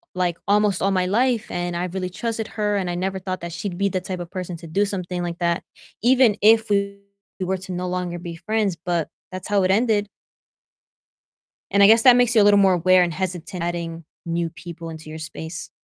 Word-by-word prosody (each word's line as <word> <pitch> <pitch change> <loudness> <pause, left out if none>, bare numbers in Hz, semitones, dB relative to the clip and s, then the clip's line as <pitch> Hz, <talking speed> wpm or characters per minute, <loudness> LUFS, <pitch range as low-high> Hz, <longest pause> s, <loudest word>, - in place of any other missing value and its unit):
like, 175 -2 0
almost 205 -2 +2
all 195 - +2
my 185 -1 +1
life, 235 +3 +1
and 175 0 -3
I 175 +1 -1
really 185 0 -4
trusted 225 +3 -3
her, 210 -1 -1
and 185 -2 -2
I 175 - -2
never 190 +1 -2
thought 185 -1 -5
that 170 0 -6
she'd 175 +1 -5
be 200 0 +1
the 185 -1 -2
type 185 -1 -5
of 175 -1 -7
person 180 -2 -5
to 165 0 -11
do 200 +6 +1
something 180 -3 -4
like 170 0 -4
that 170 -1 0 0.4
even 245 -3 +5
if 220 +1 +5
we 200 0 0 0.4
were 190 +1 -1
to 185 0 -9
no 180 0 -3
longer 180 -1 -3
be 170 -1 -7
friends, 205 +1 -1
but 175 -3 -1 0.2
that's 185 -1 -7
how 200 -2 +2
it 185 - +2
ended. 210 -1 +2 1.6
And 200 +1 +5
I - - +9
guess 225 +1 +6
that 250 -2 +8
makes 245 -1 +3
you 215 - +7
a - - +5
little 205 0 +6
more 190 -2 +5
aware 180 +1 +4
and 170 -2 -2
hesitant 180 0 -4
adding 170 -1 -4 0.2
new 170 0 -1
people 165 0 -9
into 160 -1 -9
your 160 +1 -7
space. 160 +1 -7
185 Hz, 220 wpm, -22 LUFS, 175-205 Hz, 1.6 s, I